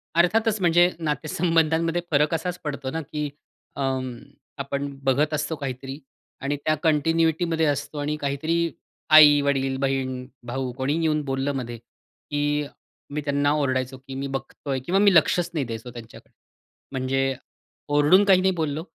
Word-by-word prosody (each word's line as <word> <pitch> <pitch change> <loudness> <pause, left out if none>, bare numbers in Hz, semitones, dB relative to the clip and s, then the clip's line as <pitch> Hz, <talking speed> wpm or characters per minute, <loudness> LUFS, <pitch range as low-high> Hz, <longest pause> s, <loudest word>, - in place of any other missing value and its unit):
अर्थातच 215 +5 +3
म्हणजे 175 0 +5
नातेसंबंधांमध्ये 165 +2 +1
फरक 150 +2 +3
असाच 175 +2 -2
पडतो 140 -3 -4
ना 160 - -3
की 150 0 -4 0.5
अं, 130 -2 -1 0.5
आपण 140 0 -3 0.2
बघत 145 +3 +2
असतो 155 +2 -1
काहीतरी 135 0 -6 0.4
आणि 140 +1 -1
त्या 155 - +3
कंटिन्युइटीमध्ये 160 +1 +2
असतो. 145 +1 -2
आणि 150 +1 -1
काहीतरी 145 +3 -1 0.6
आई-वडील, 140 -3 +5
बहीण-भाऊ 130 -1 -3
कोणीही 145 +5 0
येऊन 155 -1 +1
बोललं 135 +1 -1
मध्ये, 120 -2 -4
की 145 +5 -4 0.5
मी 150 - -2
त्यांना 145 0 +1
ओरडायचो 130 -3 -1
की 130 +1 -10
मी 140 +1 -3
बघतोय 135 0 -4
किंवा 190 +5 +2
मी 200 -1 +5
लक्षच 175 +2 +3
नाही 150 -6 -1
द्यायचो 115 +1 -7
त्यांच्याकडे. 115 -2 -12 0.6
म्हणजे 135 0 0 0.5
ओरडून 145 +7 +5
काही 190 -2 +5
नाही 190 0 +2
बोललो. 160 -2 -2
145 Hz, 135 wpm, -24 LUFS, 135-160 Hz, 0.6 s, म्हणजे